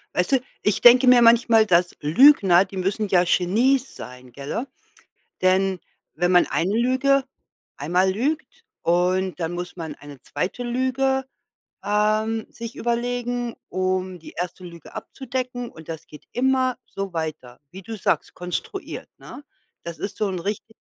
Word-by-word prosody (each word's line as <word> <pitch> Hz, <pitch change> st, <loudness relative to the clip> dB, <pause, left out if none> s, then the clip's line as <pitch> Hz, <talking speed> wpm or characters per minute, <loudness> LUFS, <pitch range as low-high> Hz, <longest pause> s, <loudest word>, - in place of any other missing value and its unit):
Weißt 180 Hz, +9 st, +1 dB
du, 265 Hz, -, +5 dB, 0.2 s
ich 210 Hz, -2 st, +1 dB
denke 250 Hz, +2 st, +7 dB
mir 250 Hz, -1 st, +7 dB
manchmal, 230 Hz, -1 st, +5 dB
dass 175 Hz, -2 st, +2 dB
Lügner 190 Hz, -, +6 dB
die 190 Hz, +1 st, -10 dB
müssen 195 Hz, +3 st, -1 dB
ja 180 Hz, -2 st, +4 dB
Genies 235 Hz, +10 st, +1 dB
sein, 125 Hz, 0 st, -11 dB
gell? 140 Hz, -, -4 dB, 0.8 s
Denn 185 Hz, 0 st, +2 dB, 0.4 s
wenn 175 Hz, 0 st, +1 dB
man 180 Hz, -1 st, +5 dB
eine 190 Hz, +5 st, 0 dB
Lüge 260 Hz, +3 st, +2 dB, 0.5 s
einmal 180 Hz, +6 st, +1 dB
lügt 300 Hz, -, -3 dB, 0.2 s
und 180 Hz, +2 st, +1 dB
dann 165 Hz, 0 st, -2 dB
muss 175 Hz, 0 st, -6 dB
man 160 Hz, -3 st, -6 dB
eine 145 Hz, -2 st, -13 dB
2. 200 Hz, +7 st, -4 dB
Lüge, 260 Hz, +2 st, 0 dB, 0.6 s
ähm, 215 Hz, +2 st, +1 dB
sich 230 Hz, -1 st, -8 dB
überlegen, 240 Hz, 0 st, -2 dB
um 185 Hz, -1 st, -2 dB
die 160 Hz, -, -12 dB
1. 180 Hz, +1 st, -5 dB
Lüge 170 Hz, -3 st, -12 dB
abzudecken, 250 Hz, -2 st, -5 dB
und 160 Hz, -1 st, -14 dB
das 160 Hz, -1 st, -7 dB
geht 150 Hz, -, -14 dB
immer 260 Hz, 0 st, +1 dB
so 195 Hz, -2 st, -6 dB
weiter, 155 Hz, -7 st, -5 dB
wie 190 Hz, +2 st, -10 dB
du 225 Hz, +4 st, -6 dB
sagst, -, -, -1 dB
konstruiert, 390 Hz, -, -6 dB
ne? 290 Hz, -, -11 dB, 0.4 s
Das 170 Hz, -2 st, -7 dB
ist 200 Hz, -, -5 dB
so 210 Hz, -, 0 dB
'n 185 Hz, -2 st, -3 dB
richti 205 Hz, +4 st, -5 dB
200 Hz, 150 wpm, -23 LUFS, 175-245 Hz, 0.8 s, denke